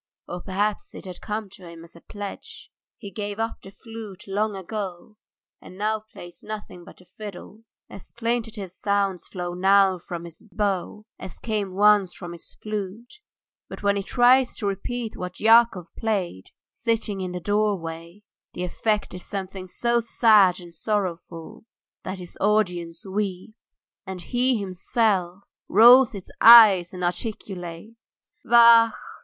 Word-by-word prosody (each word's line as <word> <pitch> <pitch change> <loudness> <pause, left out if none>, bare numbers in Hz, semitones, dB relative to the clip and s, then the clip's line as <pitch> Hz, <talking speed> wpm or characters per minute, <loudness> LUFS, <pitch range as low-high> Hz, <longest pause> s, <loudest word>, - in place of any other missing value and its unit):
Or 175 0 -6
perhaps 200 +3 -2
it - - -10
had 185 -1 -9
come 210 0 -4
to 190 -2 -13
him 165 0 -12
as 170 - -13
a 170 - -15
pledge. 205 -1 -9 0.3
He 200 -3 -10
gave 205 +1 -5
up 225 0 -3
the - - -12
flute 215 -2 -10
long 205 +2 -1
ago, 195 +1 -7 0.4
and 185 - -13
now 215 +2 0
plays 175 0 -11
nothing 210 -4 -8
but - - -15
the 180 - -20
fiddle. 210 +1 -10 0.2
As 195 - -12
plaintive 230 -4 -3
sounds 195 -2 -1
flow 175 -1 -5
now 190 0 +3
from 170 0 -7
his 170 -2 -10
bow, 205 +1 -2
as 190 - -8
came 205 -5 -3
once 205 -2 +4
from 175 -2 -8
his 170 -1 -10
flute, 215 - -6 0.5
but - - -9
when 200 0 +2
he 200 - -1
tries 245 +4 +3
to 210 - -4
repeat 220 +4 -4
what 180 0 -7
Yakov 225 -5 +5
played, 195 - -2 0.3
sitting 225 -4 -2
in 185 -1 -4
the 180 - -5
doorway, 180 -2 -2 0.3
the 180 - -4
effect 210 +4 -1
is 180 - -8
something 190 -1 -6
so 235 +5 0
sad 215 -5 +4
and 175 -1 -13
sorrowful 180 -5 -4 0.4
that 185 +1 -5
his 180 -1 -9
audience 180 -5 0
weep, 195 0 -4 0.5
and 185 -2 -7
he 250 +5 +1
himself 195 -1 -1 0.3
rolls 240 +4 +7
his 195 -3 -9
eyes 215 -7 +9
and 180 -1 -7
articulates 190 +2 -6 0.2
"Vachhh! 235 -1 +6
200 Hz, 150 wpm, -24 LUFS, 180-220 Hz, 0.5 s, eyes